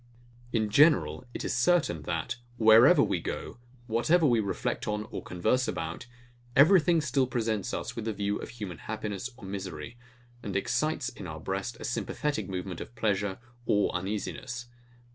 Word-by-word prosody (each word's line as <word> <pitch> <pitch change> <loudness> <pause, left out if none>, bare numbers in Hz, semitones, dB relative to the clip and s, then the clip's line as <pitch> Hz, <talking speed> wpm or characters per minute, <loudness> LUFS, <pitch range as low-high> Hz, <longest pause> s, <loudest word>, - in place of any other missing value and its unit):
In 110 -3 0
general, 105 - +4
it - - -5
is - - -1
certain, 125 - +2
that, 90 +8 -2 0.2
wherever 110 0 +7
we - - 0
go, - - -5 0.3
whatever 130 +9 +3
we 120 -5 +4
reflect 100 -3 -2
on 105 0 -1
or - - -4
converse 125 +9 0
about, 80 +8 -4 0.5
everything 165 +2 +6
still 135 -2 +1
presents 115 -2 -1
us - - -4
with 115 - -4
the 110 - -1
view 100 0 -1
of - - -7
human 100 -9 -7
happiness 105 0 -4
or 100 - -11
misery, 95 +1 -6 0.4
and 100 -4 -5
excites 145 +6 0
in 100 - -9
our 80 -1 -6
breast 95 +8 -3
a - - -8
sympathetic 125 -4 -2
movement 90 -1 -4
of 120 - -9
pleasure 100 -2 0 0.3
or 105 -1 +3
uneasiness. 110 +6 -4
110 Hz, 160 wpm, -29 LUFS, 95-125 Hz, 0.5 s, wherever